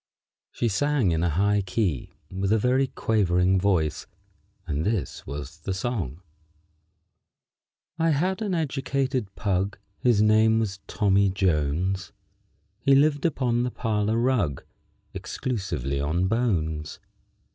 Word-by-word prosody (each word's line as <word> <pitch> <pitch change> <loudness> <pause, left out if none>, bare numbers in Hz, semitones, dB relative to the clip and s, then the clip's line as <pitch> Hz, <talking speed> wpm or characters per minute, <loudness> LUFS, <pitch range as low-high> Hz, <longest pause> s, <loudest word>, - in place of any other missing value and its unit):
] - - -69
She 120 - -1
sang 135 -2 +1
in 80 0 0
a 85 - +2
high 100 +6 +2
key 95 - -2 0.2
with 95 +1 -1
a 110 - +5
very 130 +4 +2
quavering 95 -6 +2
voice, 90 -6 0 0.6
and 75 -2 -2
this 105 0 -2
was 70 +3 -7
the 95 +5 -3
song: 95 - -3 1.8
_I 165 0 +3
had 185 +8 0
an 200 -4 -1
educated 135 - -1
pug, 100 -1 -1 0.2
His 120 -4 +3
name 110 +1 +4
was 100 -4 -2
Tommy 100 -2 +2
Jones; 95 +1 0 0.7
He 135 +2 +4
lived 145 +2 +3
upon 125 -6 0
the 125 - 0
parlor 110 -2 -1
rug 115 - +1 0.5
Exclusively 90 - -3
on 80 +6 0
bones. 85 -9 -1
100 Hz, 125 wpm, -25 LUFS, 90-125 Hz, 1.8 s, a